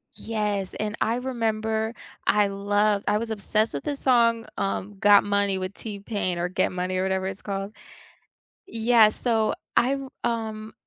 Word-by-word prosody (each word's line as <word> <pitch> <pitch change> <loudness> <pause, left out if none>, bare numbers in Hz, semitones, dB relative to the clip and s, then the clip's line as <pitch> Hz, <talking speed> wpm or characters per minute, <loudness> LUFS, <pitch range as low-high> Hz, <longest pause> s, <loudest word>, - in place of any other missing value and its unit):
Yes, 210 -4 -2
and 210 -1 -2
I 225 - +2
remember 220 -3 -1 0.3
I 210 0 +4
loved 205 +1 +1
I 210 - +3
was 225 +1 -3
obsessed 215 +1 0
with 140 - -4
the 290 - -2
song, 235 -4 +3
um, 195 +1 -2
Got 205 0 +6
Money 200 -1 +1
with 185 +1 -4
T-Pain 200 -4 -3
or 175 +1 -1
Get 185 +1 0
Money 185 0 -2
or 185 - +1
whatever 190 0 0
it's 195 +1 -6
called. 195 0 -4 0.9
Yeah, 225 -1 +4
so 220 0 +1 0.2
I'm, 270 +2 +1
um, 220 -2 -3
210 Hz, 155 wpm, -25 LUFS, 195-225 Hz, 0.9 s, Got